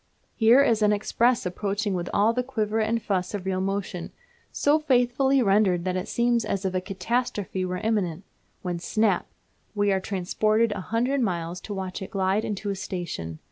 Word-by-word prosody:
Here 240 +4 +6
is 225 -5 +2
an 210 0 +4
express 230 +3 +1
approaching 200 +3 -2
with 175 -1 -3
all 215 +3 +3
the 250 - 0
quiver 220 -4 -1
and 225 +1 +1
fuss 190 -2 -2
of 195 -2 -5
real 185 -1 -1
motion, 195 -2 -3 0.4
so 295 +2 +3
faithfully 265 -1 +3
rendered 195 -4 +3
that 185 -1 -1
it 185 +1 -3
seems 235 -1 +1
as 195 0 -2
if 185 - 0
a 185 - 0
catastrophe 195 0 -2
were 180 0 -2
imminent; 190 -4 -1 0.4
when, 175 -2 -2
snap! 205 0 +1 0.5
we 205 -1 +2
are 190 - +2
transported 215 +4 +1
a 205 -2 -3
hundred 245 +7 0
miles 175 -4 -2
to 210 - -6
watch 190 -1 -5
it 190 - -6
glide 195 0 0
into 205 -1 -3
a - - -2
station. 170 - -5
205 Hz, 180 wpm, -26 LUFS, 185-230 Hz, 0.5 s, Here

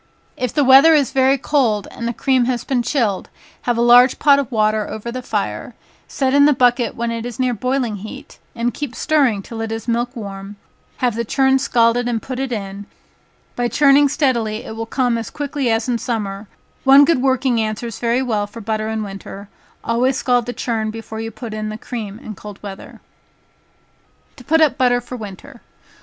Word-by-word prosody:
If 250 -3 -2
the 290 - +2
weather 275 +5 +7
is 285 -5 +2
very 265 0 +3
cold, 245 -7 0
and 235 - -5
the - - 0
cream 260 +1 +1
has 245 -1 -1
been 260 -3 0
chilled, 230 -7 -1 0.4
have 240 -1 +1
a 235 - +2
large 245 +2 +6
pot 280 -1 +5
of 275 -3 -3
water 215 -2 +1
over 220 +2 -6
the 255 +1 -5
fire, - - -4 0.3
set 265 -1 -1
in 285 0 +6
the 295 - +5
bucket 245 -2 +2
when 235 0 -2
it 230 -1 -4
is 245 0 -7
near 255 -1 +1
boiling 250 -1 -1
heat, 210 +3 -10 0.2
and 235 0 -1
keep 290 -5 -5
stirring 265 -10 +1
till 225 +2 -7
it 225 0 -4
is 225 +1 -5
milk 240 +2 -1
warm, 200 -2 -7 0.4
have 245 -2 0
the 235 +2 -2
churn 265 +3 +2
scalded 235 -1 +2
and 235 -2 -1
put 255 +2 -6
it 270 -1 -3
in, 200 -2 -5 0.7
by 245 0 0
churning 285 +2 +4
steadily, 235 -7 0
it 220 - -7
will 225 0 -5
come 245 -2 0
as 225 - -6
quick 290 -1 -6
as 235 -5 0
in 240 -2 0
summer, 210 -4 -4 0.4
one 275 +1 +7
good 280 -4 +2
working 260 -3 +1
answers 215 0 -4
very 240 +2 +1
well 215 -5 -1
for 210 +3 -11
butter 215 0 -2
in 220 -1 -2
winter, 195 0 -9 0.3
always 250 +3 +1
scald 245 -3 +1
the - - -2
churn 225 -3 -2
before 220 0 -7
you 225 - -4
put 225 0 -8
in 215 0 -4
the 215 - -5
cream 220 -4 -6
in 230 -3 -8
cold 205 0 -10
weather. 195 -1 -9 1.4
To 250 - -13
put 320 +5 +2
up 295 -3 +3
Butter 245 -1 +3
for 245 +1 -8
Winter. 225 +4 -10
240 Hz, 200 wpm, -19 LUFS, 220-260 Hz, 1.4 s, weather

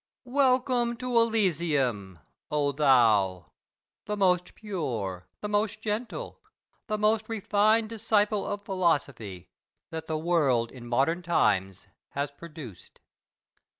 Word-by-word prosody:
Welcome 250 -2 +2
to 250 -1 -3
Elysium, 155 - +1 0.3
O 145 -1 +1
thou, 115 - +3 0.6
the 210 0 -2
most 180 -2 +2
pure, 120 - -4
the 210 - -3
most 210 +1 0
gentle, 220 +2 -4 0.5
the 215 -2 -1
most 215 +1 +1
refined 215 +1 +2
disciple 215 -2 +1
of 205 0 -4
philosophy 145 - -1 0.4
that 160 0 -6
the 160 - -1
world 145 -8 +1
in 120 -2 -11
modern 140 +8 +1
times 95 - +1 0.3
has 140 0 -2
produced! 145 - -11
175 Hz, 110 wpm, -28 LUFS, 130-215 Hz, 0.6 s, thou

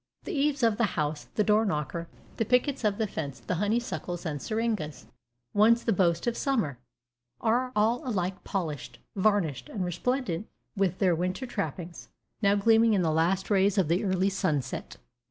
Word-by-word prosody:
The - - -5
eaves 290 -2 +1
of 225 -2 +3
the 225 -6 0
house, 150 0 -1
the 210 - +3
door 215 +1 +4
knocker, 170 -3 -2 0.3
the 225 - +2
pickets 250 +4 +1
of 205 -2 +1
the 220 - +1
fence, 145 -8 -5
the - - -3
honeysuckles 205 -5 -2
and 145 -4 -3
seringas, 215 - -2 0.5
once 225 +3 +5
the 225 - +2
boast 170 -3 +2
of 240 -1 0
summer, 220 - 0 0.6
are 245 +3 +1
all 220 +3 +2
alike 190 -7 -2
polished, 160 -8 -4 0.2
varnished, 185 - +1
and 190 -4 -3
resplendent 215 0 -1 0.3
with 195 -2 +1
their 185 -3 +3
winter 180 +9 -2
trappings, 175 - -5 0.3
now 200 -1 +4
gleaming 225 +2 +4
in 185 - +2
the 160 - +2
last 175 +6 +1
rays 200 0 +3
of 185 -6 +2
the 175 +5 +2
early 190 -1 +2
sunset. 150 -8 -2
195 Hz, 170 wpm, -28 LUFS, 170-225 Hz, 0.6 s, once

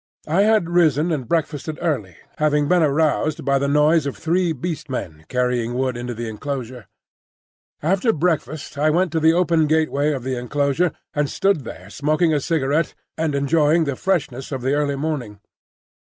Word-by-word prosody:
I 165 +6 +2
had 215 -4 +3
risen 170 -2 +2
and 135 -7 -2
breakfasted 155 -2 -1
early, 120 - -2 0.2
having 150 -1 +2
been 180 +1 +3
aroused 155 0 +1
by 140 0 +2
the 140 - 0
noise 150 +1 +3
of 140 - -5
three 170 +2 +1
Beast 160 -2 -4
Men 80 -11 -5
carrying 125 -1 0
wood 130 -1 0
into 120 0 -5
the 115 +1 -4
enclosure. 125 -1 -5 1.0
After 195 +8 +2
breakfast 155 -4 -2
I 155 +1 +3
went 175 +2 +1
to 160 - 0
the 160 +1 +4
open 170 -3 +2
gateway 155 -1 +1
of 135 -4 -3
the 130 -1 -2
enclosure, 145 +6 0 0.2
and 145 -1 0
stood 195 -9 +1
there 95 -2 -9
smoking 155 +5 +1
a 150 - +2
cigarette 150 +1 0 0.2
and 160 -3 -1
enjoying 150 +3 +3
the 140 -3 -2
freshness 135 -7 -2
of 130 -3 -4
the 135 +2 +1
early 145 -1 0
morning. 135 -8 -4
150 Hz, 170 wpm, -21 LUFS, 130-165 Hz, 1.0 s, the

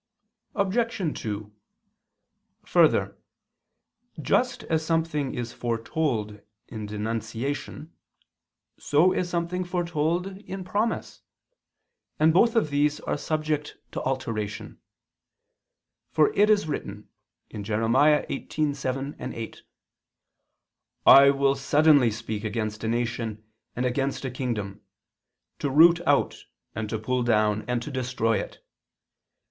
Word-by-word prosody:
Obj. 200 -4 -1
2: 105 -1 -5 1.1
Further, - - +3 1.0
just - - +1
as 160 -1 0
something 160 -4 -1
is 120 -1 -4
foretold 115 -3 -2 0.3
in 110 -2 -6
denunciation, 115 +8 -4 0.9
so 165 +6 +3
is 180 - -1
something 175 +1 -2
foretold 175 -1 -1
in 195 -2 -7
promise, 210 +5 -2 1.0
and 160 +1 +5
both 230 +7 +4
of 185 -10 +2
these 145 +1 +1
are - - -2
subject 155 0 -2
to - - -4
alteration. 110 -6 -4 1.3
For 155 -2 +3
it 210 +1 +4
is 205 -6 +3
written 105 -8 -5 0.4
(Jer. 105 - -6 0.2
18:7, 140 +1 +1 0.2
8): 115 -1 -7 1.4
"I 140 0 +9
will 140 0 +3
suddenly 145 -1 +4
speak 110 -1 -5
against 110 0 -3
a - - -1
nation 115 -2 -2 0.3
and 125 - -1
against 135 +2 -1
a 130 - -3
kingdom, 110 -6 -4 0.8
to 145 - -1
root 165 +5 +6
out, - - +1 0.3
and 110 -1 -4
to 110 - -2
pull 125 +4 -1
down, 110 -3 +2
and 125 -1 -1
to 150 - -6
destroy 125 -4 0
it. - - -8
135 Hz, 110 wpm, -26 LUFS, 115-160 Hz, 1.4 s, I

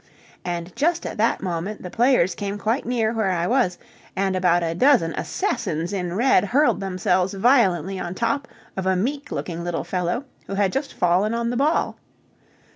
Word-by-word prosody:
And 175 0 -4
just 335 +3 +1
at - - -5
that 225 -1 +1
moment 185 +3 -3
the 180 - -7
players 235 -7 +3
came 200 0 -4
quite 225 +6 -1
near 230 -3 +1
where 220 -4 0
I 175 -2 0
was, 230 -6 +1 0.4
and 190 0 0
about 175 -2 +2
a 165 0 -1
dozen 230 - +3
assassins 165 +5 -2
in 180 -2 -2
red 240 -3 +4
hurled 285 +8 +2
themselves 185 0 0
violently 195 - +3
on 175 0 -4
top 235 +6 -1 0.3
of 190 -1 -3
a 190 - +3
meek 280 +9 -2
looking 170 -1 -4
little 175 -1 -2
fellow 180 +8 -2 0.2
who 195 - -4
had 195 -2 +1
just 275 +1 -3
fallen 185 +5 +2
on 235 0 -1
the - - -2
ball. 295 +5 +1
195 Hz, 180 wpm, -23 LUFS, 180-240 Hz, 0.4 s, red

